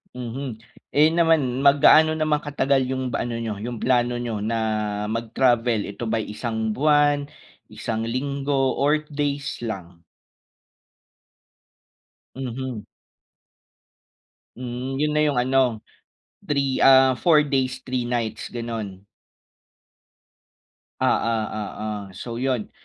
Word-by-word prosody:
Mhm. 120 -2 -6 0.3
Eh, 155 +2 +5
yun 170 - 0
naman 150 -7 +2
mag 140 0 +4
gaano 155 0 +7
naman 155 -1 +1
katagal 140 -3 0
yung 130 -1 -2
ba - - -2
ano 120 - -4
nyo 110 -3 -4
yung 120 +1 -5
plano 120 -1 +2
nyo 120 -3 -3
na 115 +2 -1 0.5
mag-travel, 115 -1 +1
ito 105 +3 -6
ba'y 110 -1 -2
isang 110 0 -2
buwan, 145 +2 +3 0.4
isang 115 0 -4
linggo 135 +1 -1
or 150 +2 +2
days 140 -1 -2
lang? 90 -7 -7 2.3
Mhm. 130 -3 -5 1.7
Hmm, 125 +2 -5
'yon 150 +2 0
na 150 - +1
yung 145 - 0
ano, 125 -2 +1 0.6
3 140 -2 0
ah, 130 -1 +7
4 155 -4 +5
days 130 -2 -1
3 125 -2 -2
nights 120 -3 -2
gano'n? 110 -5 -6 2.0
Oo, 115 - +2 0.3
oo. 105 +1 -5 0.3
So 115 +3 -6
'yon, 130 -4 -1
130 Hz, 115 wpm, -23 LUFS, 115-140 Hz, 2.3 s, gaano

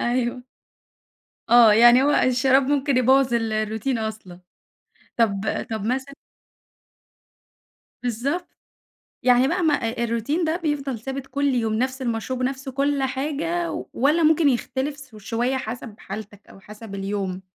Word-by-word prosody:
أيوه. 240 0 -1 1.1
آه. 235 -2 +8
يعني 240 +4 +7
هو 285 - +3
الشراب 265 0 +3
ممكن 280 0 0
يبوّظ 260 0 +3
ال 225 -2 0
الروتين 220 +3 -1
أصلًا. 215 -5 -6 0.8
طَب 205 -4 +2 0.3
طَب 220 -2 -3
مثلًا 265 +4 -2 1.9
بالضبط. 260 +9 -2 0.8
يعني 250 +1 +4
بقى 355 +4 0
ما، 315 -2 +3
آآ 235 -3 -1
الروتين 235 +9 -1
ده 320 0 0
بيفضل 290 -7 -3
ثابت 270 +3 -6
كل 280 +2 -2
يوم، 235 -5 0
نَفْس 255 +4 -1
المشروب 240 +1 -3
ونَفْس 265 +1 -3
كل 275 +1 0
حاجة 300 +6 -2 0.2
والّا 300 +6 +2
ممكن 310 -1 +4
يختلف 265 +3 -2
س 265 -6 -14
شوية 235 +5 -2
حَسَب 230 -2 -6
حالتَك 205 -1 -9
أو - - -15
حَسَب 210 +1 -10
اليوم؟ 195 -1 -4
255 Hz, 135 wpm, -23 LUFS, 225-275 Hz, 1.9 s, آه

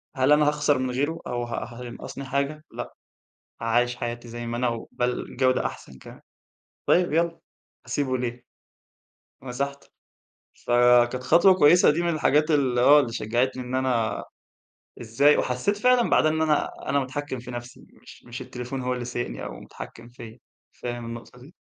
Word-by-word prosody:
هل 130 +2 +2
أنا 150 0 +5
هاخسَر 145 -1 +2
من 130 0 -2
غيره، 145 +6 -1
أو 120 0 -2
ه 120 -2 -4 0.2
هينقَّصني 125 +3 -8
حاجة؟ 140 +3 -2
لأ. - - -7 0.7
عايِش 120 +2 +1
حياتي 120 0 -5
زي 120 +1 -7
ما 120 0 -3
أنا، 125 +1 +1
وبل 125 +1 -3
جودة 130 0 +2
أحسن 65 - -7
كمان. - - -13 0.7
طيب 175 -3 +3
يالَّا، 165 +1 +1 0.5
هاسيبه 130 -3 -1
ليه؟ 120 0 -4 1.0
مسَحته. 140 +2 -5 0.8
فكانت 120 +1 +4
خطوة 170 +8 +6
كويِسة، 175 +1 +6
دي 160 +4 -1
من 170 - +1
الحاجات 155 +1 +2
ال 135 -5 +2
آه، 145 +4 +7
اللي 120 -5 -1
شجَّعتني، 125 +3 -1
إن 125 +1 -4
أنا 125 -4 0 0.8
إزاي 120 +6 +3
وحسّيت 130 +12 0
فعلًا 250 +1 +3
بعدها 155 - +4
إن 160 - -1
أنا 155 -2 +1 0.2
أنا 140 +1 +2
متحكّم 130 0 -4
في 125 +1 -9
نفسي، 120 0 -9 0.2
مش - - -15
مش 120 +2 -8
التليفون 125 +1 -6
هو 125 0 -1
اللي 125 -1 -4
سايِقني 120 0 -4
أو - - -7
متحكّم 115 +1 -11
فيَّا. 115 -2 -11 0.3
فاهم 120 -1 -6
النقطة 115 +1 -9
دي؟ 140 +8 -16
125 Hz, 160 wpm, -25 LUFS, 120-145 Hz, 1.0 s, آه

